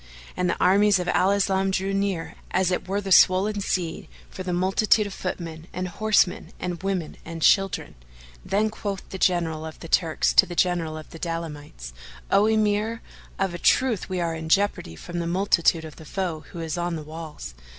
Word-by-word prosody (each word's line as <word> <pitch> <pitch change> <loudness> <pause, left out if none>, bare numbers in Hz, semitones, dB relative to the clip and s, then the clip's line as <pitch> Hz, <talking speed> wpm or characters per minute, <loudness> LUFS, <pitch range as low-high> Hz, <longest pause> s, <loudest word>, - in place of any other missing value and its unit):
And 180 -1 0
the - - -1
armies 200 +2 +5
of 180 -1 -3
Al 185 - +3
Islam 195 -1 +2
drew 190 +1 -1
near, 195 -4 -1 0.2
as 185 0 +1
it 180 - -2
were 200 +2 -1
the 195 -1 -6
swollen 195 +3 +5
sea, 175 -4 -2 0.2
for - - -7
the 185 -1 -3
multitude 195 +4 +2
of 200 - -6
footmen 165 -3 -5
and 185 0 -3
horsemen 205 -1 +1
and 175 -2 -4
women 190 -5 -3
and 165 -1 -6
children. 195 -2 +3 0.5
Then 215 +2 +1
quoth 200 -3 -5
the 190 - -7
General 165 -4 +1
of 160 0 -8
the 165 - -9
Turks 160 -1 +2
to 195 - +6
the 175 - -7
General 170 -3 +1
of 155 - -11
the 165 - -10
Daylamites, 150 - -6 0.4
"O 205 +2 +5
Emir, 220 +1 +1 0.3
of 195 -2 -1
a 175 - -5
truth, 245 -2 +2
we 185 -1 -2
are 170 -1 -1
in 160 0 -6
jeopardy 195 - +1
from 175 - -6
the 170 - -2
multitude 170 -2 +2
of 155 - -11
the 160 - -12
foe 170 -2 -3
who 170 - -7
is 160 0 -3
on 175 0 -1
the 155 - -5
walls. 155 - -8
180 Hz, 195 wpm, -25 LUFS, 165-195 Hz, 0.5 s, to